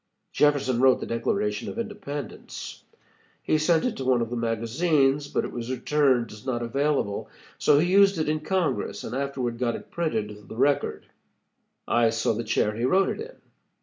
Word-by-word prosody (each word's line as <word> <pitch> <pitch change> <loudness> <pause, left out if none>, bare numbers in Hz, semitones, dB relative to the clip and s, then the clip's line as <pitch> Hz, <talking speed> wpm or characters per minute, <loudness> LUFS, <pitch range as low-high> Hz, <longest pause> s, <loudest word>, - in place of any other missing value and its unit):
Jefferson 140 -4 +2
wrote 130 -1 +5
the - - -4
Declaration 105 -2 -1
of - - -7
Independence. 205 - -6 0.6
He 155 - +2
sent 160 +1 +2
it 250 - -1
to 135 - -4
one 130 -1 +3
of 115 0 -2
the - - -2
magazines, 135 +5 +1
but - - -1
it - - -6
was 120 0 -5
returned 130 -2 +1
as 105 0 -11
not 120 -3 -2
available, 135 -3 -1 0.3
so 145 - +4
he 175 +4 +2
used 195 -1 +5
it 155 - -1
in 155 0 0
Congress 180 +1 -1
and - - -6
afterward 130 -4 -2
got 120 -2 0
it - - -10
printed 110 -11 -1
in 105 -1 -13
the - - -9
Record. 140 +3 +1 0.8
I 120 -1 +3
saw 115 0 0
the 115 +2 -3
chair 105 -1 0
he 115 - -3
wrote 190 +10 +3
it - - -4
in. 485 +3 -8
135 Hz, 185 wpm, -26 LUFS, 115-155 Hz, 0.8 s, wrote